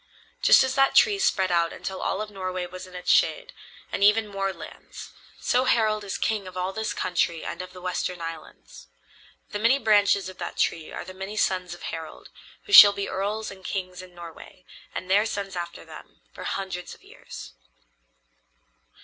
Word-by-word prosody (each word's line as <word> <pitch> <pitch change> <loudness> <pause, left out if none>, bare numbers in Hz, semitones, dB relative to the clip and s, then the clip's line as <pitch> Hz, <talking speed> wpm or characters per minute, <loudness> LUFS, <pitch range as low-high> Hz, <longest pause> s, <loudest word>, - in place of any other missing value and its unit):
Just - - +7
as 260 -1 -1
that 270 0 +3
tree 405 -2 +5
spread 190 - +2
out 170 -1 +2
until 190 -1 -6
all 205 - -1
of 210 - -10
Norway 185 -2 -4
was 185 +1 -9
in 185 - -14
its 180 - 0
shade, - - +2 0.4
and - - -1
even 210 +1 +5
more 195 -1 -2
lands, - - -11 0.3
so 250 +1 +1
Harald 215 -4 +2
is 195 - -4
king 210 -4 -1
of 185 0 -9
all 185 +1 -2
this 220 +1 -3
country 175 -2 -1
and - - -5
of 185 - -8
the 180 - -12
western 180 0 -2
islands. 165 - -9 0.6
The 205 - -3
many 230 +5 +4
branches 205 -5 +3
of 185 0 -10
that - - -6
tree 160 -2 -1
are - - -6
the 185 - -9
many 190 +3 -7
sons 185 -3 0
of - - -15
Harald, 160 -1 -7 0.3
who 405 - -8
shall 205 - +12
be 200 0 -3
earls 210 +3 -3
and 190 -1 -13
kings 185 -2 -4
in 180 -1 -14
Norway, 175 +1 -12 0.3
and 185 - -5
their 205 +4 +3
sons 200 -3 -4
after 170 -1 -6
them, - - -14
for - - -9
hundreds 190 -2 -4
of - - -24
years." - - -11
190 Hz, 190 wpm, -25 LUFS, 180-210 Hz, 0.6 s, shall